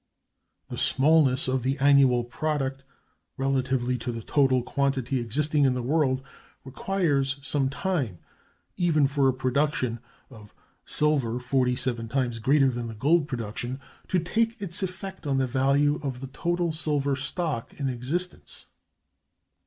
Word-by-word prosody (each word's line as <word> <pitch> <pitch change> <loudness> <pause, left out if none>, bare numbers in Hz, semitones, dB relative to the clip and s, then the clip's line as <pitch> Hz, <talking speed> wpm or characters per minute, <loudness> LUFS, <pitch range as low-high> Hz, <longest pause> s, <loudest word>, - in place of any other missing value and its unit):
The - - -5
smallness 140 -2 +4
of 130 0 0
the 135 +3 -1
annual 135 -3 +5
product 135 +1 -2 0.5
relatively 130 -2 0
to 120 +2 -3
the 115 -1 -6
total 130 -2 +2
quantity 135 -1 -1
existing 145 +6 0
in 130 -2 +3
the 125 - -3
world 135 -1 +1 0.4
requires 140 -2 0
some 135 -1 0
time, 135 - -2 0.6
even 160 -5 +3
for 140 0 +2
a - - +1
production 130 -2 0 0.3
of 105 -4 -14 0.3
silver 140 -6 +1
forty 125 0 +1
seven 120 -3 -2
times 125 -3 -1
greater 135 +3 +3
than 120 -1 -4
the 115 - -7
gold 150 +7 +2
production, 120 +1 -4 0.3
to 185 - +1
take 225 +7 0
its 195 -3 -4
effect 190 -2 -6
on 135 -1 +1
the 135 - +2
value 140 +3 +2
of 135 -4 -4
the 135 - -6
total 175 +1 0
silver 145 -3 0
stock 150 -2 -3
in 140 - -1
existence. 135 +9 -4
135 Hz, 140 wpm, -26 LUFS, 125-150 Hz, 0.6 s, annual